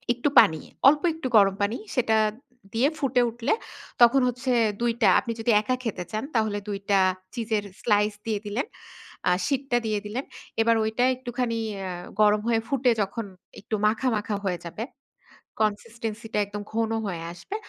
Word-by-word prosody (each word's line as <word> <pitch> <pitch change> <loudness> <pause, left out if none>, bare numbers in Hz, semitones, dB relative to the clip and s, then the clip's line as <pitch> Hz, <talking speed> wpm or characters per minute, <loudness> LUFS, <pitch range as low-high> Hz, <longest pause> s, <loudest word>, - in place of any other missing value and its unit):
একটু 245 +5 0
পানি। 160 -1 +4 0.3
অল্প 295 +1 +2
একটু 320 -4 -4
গরম 195 -2 +5
পানি, 205 +4 0 0.2
সেটা 230 -3 +2 0.6
দিয়ে 235 +5 +3
ফুটে 255 -2 +2
উঠলে 235 +4 -1 0.5
তখন 240 +3 +7
হচ্ছে 250 +1 -2 0.3
২ 240 0 +2
টা, 205 - +6
আপনি 235 - -4
যদি 225 +1 +1
একা 255 +4 0
খেতে 205 -6 -3
চান, 215 0 -2
তাহলে 220 -2 +1
২ 200 -1 -3
টা 200 -1 +5 0.3
চিজের 225 -3 -1 0.2
স্লাইস 210 -1 +2
দিয়ে 220 -2 -1
দিলেন। 215 +8 -2 0.6
আ - - +4 0.2
শিটটা 275 -3 0
দিয়ে 215 -1 0
দিলেন। 235 +6 -4 0.4
এবার 230 0 +4
ওইটা 220 +3 0
একটুখানি 245 -2 -3 0.3
আ - - -4 0.3
গরম 210 0 +5
হয়ে 230 -1 +3
ফুটে 255 -3 +2
যখন 205 +3 -3 0.4
একটু 215 - -3
মাখা, 225 +4 0
মাখা 210 0 -2
হয়ে 180 -2 -1
যাবে। 170 +6 -5 0.8
কনসিস্টেন্সি 225 +1 -2
-টা - - +2
একদম 205 +1 -6
ঘন 225 0 0 0.2
হয়ে 175 -4 -4
আসবে। 175 - -8
225 Hz, 165 wpm, -26 LUFS, 210-245 Hz, 0.8 s, তখন